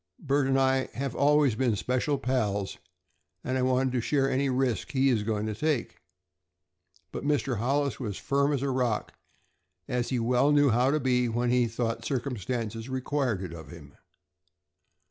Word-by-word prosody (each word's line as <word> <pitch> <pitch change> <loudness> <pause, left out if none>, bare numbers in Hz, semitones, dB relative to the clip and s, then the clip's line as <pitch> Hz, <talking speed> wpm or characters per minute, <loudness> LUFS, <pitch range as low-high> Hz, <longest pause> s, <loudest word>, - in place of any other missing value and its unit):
"Bert 140 -3 0
and 135 0 +2
I 130 0 +2
have 135 -1 -3
always 145 -2 +4
been 115 0 +1
special 130 +7 0
pals, 105 -7 -1 0.6
and 130 - -2
I 130 - +1
wanted 130 0 +2
to 125 - +1
share 135 +3 +1
any 135 +1 +1
risk 130 0 -1
he 135 0 +3
is 115 -5 +2
going 105 0 -2
to 110 - -2
take." 145 +3 -1 1.1
But - - -5
Mr. 140 -4 0
Hollis 140 +1 0
was 105 -7 -4
firm 140 +1 +1
as 140 -2 -1
a 140 - 0
rock, 125 -4 -1 0.7
as 125 -1 -1
he 130 - 0
well 125 +4 +2
knew 145 -2 +4
how 125 +3 +3
to 155 +2 +1
be 125 -2 +1
when 120 +1 0
he 125 -1 +3
thought 115 0 -3
circumstances 120 -2 -3
required 130 -5 -1
it 90 -3 -6
of 80 -4 -10
him. - - -13
130 Hz, 170 wpm, -28 LUFS, 115-135 Hz, 1.1 s, always